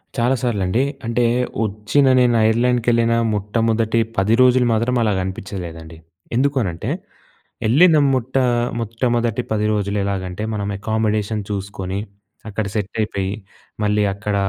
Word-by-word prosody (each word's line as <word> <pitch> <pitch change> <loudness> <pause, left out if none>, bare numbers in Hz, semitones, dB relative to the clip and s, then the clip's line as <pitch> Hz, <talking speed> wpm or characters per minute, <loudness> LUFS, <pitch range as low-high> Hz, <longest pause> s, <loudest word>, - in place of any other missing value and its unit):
చాలా 120 +3 +2
సార్లండి. 110 -1 0 0.2
అంటే 115 +1 0 0.4
వచ్చిన 105 +7 +1
నేను 120 -1 +3
ఐర్లాండ్‌కెళ్ళిన 115 0 +2 0.2
మొట్టమొదటి 115 +2 0 0.2
10 105 +4 +3
రోజులు 130 0 +5
మాత్రం 115 +3 +1
అలాగ 105 -3 +1
అనిపించలేదండి. 85 -4 -7 0.4
ఎందుకు 140 +3 +2
అనంటే 85 -5 -3 0.7
వెళ్ళిన 155 +9 +5 0.2
మొట్ట 130 0 -2 0.4
మొట్టమొదటి 115 +1 -1
10 105 -1 +1
రోజులు 100 0 -1
ఎలాగంటే 95 0 -3
మనం 100 -1 -2
అకామిడేషన్ 110 0 -1
చూసుకొని, 100 -1 -4 0.5
అక్కడ 105 +1 -3
సెట్ 100 -2 -3
అయిపోయి. 100 -2 -2 0.5
మళ్ళీ 105 0 +2
అక్కడ 100 +1 -3
110 Hz, 115 wpm, -20 LUFS, 100-120 Hz, 0.7 s, రోజులు